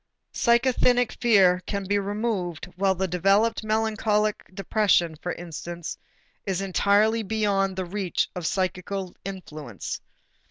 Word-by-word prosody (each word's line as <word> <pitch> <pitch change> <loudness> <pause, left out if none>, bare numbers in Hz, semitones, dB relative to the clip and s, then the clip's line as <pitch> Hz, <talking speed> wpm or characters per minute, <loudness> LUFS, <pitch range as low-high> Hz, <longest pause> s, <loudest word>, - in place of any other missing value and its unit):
Psychasthenic 245 0 +3
fear 190 -6 +5
can 200 -1 -2
be 205 +1 +1
removed, 200 -4 -2
while 190 +1 +2
the 190 +1 -1
developed 195 +6 +2
melancholic 215 -1 0
depression, 195 -3 +2
for 175 +3 -5
instance, 170 0 -6 0.5
is 190 -2 -2
entirely 200 +4 +2
beyond 200 -3 0
the 185 -1 -3
reach 190 0 -1
of 175 -3 -3
psychical 185 0 -2
influence. 155 - -7
195 Hz, 115 wpm, -25 LUFS, 180-215 Hz, 0.5 s, fear